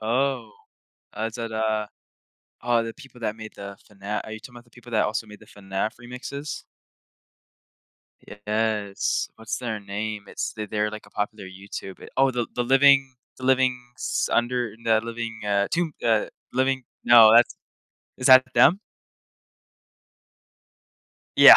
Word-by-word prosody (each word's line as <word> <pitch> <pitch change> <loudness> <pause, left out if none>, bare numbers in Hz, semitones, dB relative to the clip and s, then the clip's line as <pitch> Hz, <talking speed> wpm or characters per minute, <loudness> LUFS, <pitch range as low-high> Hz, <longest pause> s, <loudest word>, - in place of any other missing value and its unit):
Oh. 120 +1 0 0.7
Uh, 110 - -2
is 115 - -7
that, 115 -2 -5
uh 110 -1 0 0.8
aw, 120 -1 +2
the 115 0 -5
people 130 -2 -15
that 110 -1 -2
made 110 -1 -9
the 100 0 -8
FNA 105 0 -4
Are - - -9
you 110 - -6
talking 125 - -12
about 120 - -12
the 120 - -27
people 120 0 -15
that 110 - +3
also 110 +1 -2
made 105 -1 -13
the - - -16
FNAF 95 +2 -4
remixes? 125 +4 -6 1.8
Yes. 105 -2 0
What's 110 -1 -4
their 110 -4 -4
name? 105 +1 -4
It's - - -4
they 110 -1 -5
they're 105 0 -1
like 110 0 -9
a - - -18
popular 105 0 -4
YouTube 95 0 -9
oh, 135 0 +4
the 120 -2 -2
the 125 - 0
living 135 0 +5 0.2
the 130 - -8
livings 125 -2 0
under 120 -2 0
the 110 -1 +3
living, 115 -1 -5
uh 100 -1 +2
tomb 170 -2 0
uh, 110 -2 +3 0.3
living 130 0 +1 0.3
o, 115 -2 +10
that's 120 +1 +6 0.6
is 125 - +1
that 130 0 +9
them? 185 - +6 2.6
Yeah, - - +11
115 Hz, 150 wpm, -25 LUFS, 105-125 Hz, 2.6 s, Yeah